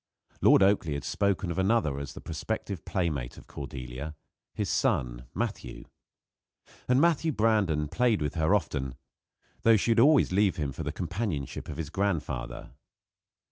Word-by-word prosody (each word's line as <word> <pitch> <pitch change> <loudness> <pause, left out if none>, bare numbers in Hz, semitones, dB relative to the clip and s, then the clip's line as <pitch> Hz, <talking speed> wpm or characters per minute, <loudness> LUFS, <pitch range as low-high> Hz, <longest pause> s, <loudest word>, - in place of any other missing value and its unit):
Lord - - +6
Oakleigh 95 -7 +2
had 70 - -4
spoken 100 -3 0
of 85 - -3
another 95 -8 +2
as 70 -1 -6
the - - -9
prospective 95 +2 -4
playmate 75 -10 -2
of - - -12
Cordelia 70 +1 -7 0.4
his - - -3
son, - - 0
Matthew. - - -4 1.0
And 125 +1 +4
Matthew 165 0 +3
Brandon 105 - +2
played 120 +6 +2
with 75 -2 -2
her 80 +4 +3
often, 70 -8 -2 0.7
though 115 -1 +6
she 115 - +1
would 115 - +4
always 145 -1 +5
leave 100 0 +3
him 75 -3 -2
for 70 - -7
the - - -2
companionship 90 - -4
of 75 - -6
his 80 -2 -4
grandfather. 90 -11 -2
85 Hz, 150 wpm, -28 LUFS, 70-105 Hz, 1.0 s, Lord